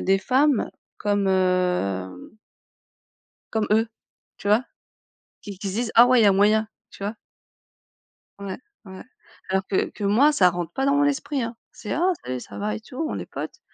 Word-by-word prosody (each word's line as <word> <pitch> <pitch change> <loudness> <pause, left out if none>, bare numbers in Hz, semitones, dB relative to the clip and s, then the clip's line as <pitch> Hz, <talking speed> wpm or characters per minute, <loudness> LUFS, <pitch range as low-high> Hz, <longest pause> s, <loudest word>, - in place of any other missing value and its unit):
des 195 +1 +3
femmes 265 +4 +2 0.3
comme, 205 -1 0
heu 180 - 0 1.1
Comme 220 -1 0
eux, 220 +2 +3 0.5
tu 200 - -5
vois? 215 +4 +4 0.8
Qui 200 -3 -9
qui 195 +1 -4
se 190 - -5
disent: 230 +1 -2
«Ah 235 +2 +8
ouais, 255 0 +5
il - - +5
y - - +6
a 200 - +7
moyen», 215 +2 +3 0.2
tu - - -10
vois? 210 +3 -3 1.2
Ouais. 200 -2 -5 0.3
Ouais. 190 -1 -10 0.5
Alors 190 0 0
que 190 - 0
que 210 - -7
moi, 230 +9 +5
ça 185 -11 +5
rentre 175 -1 -5
pas 270 +1 -1
dans 280 - +3
mon 285 0 +3
esprit, 285 -1 -1
hein, 230 0 -5 0.2
c'est: 210 - -7
«Ah 360 +4 +2
salut, 125 0 -4
ça - - -11
va?», 210 +1 -2
et - - -8
tout, 250 +3 -13
on - - -3
est - - -6
potes, - - -7
205 Hz, 190 wpm, -24 LUFS, 190-240 Hz, 1.2 s, Ah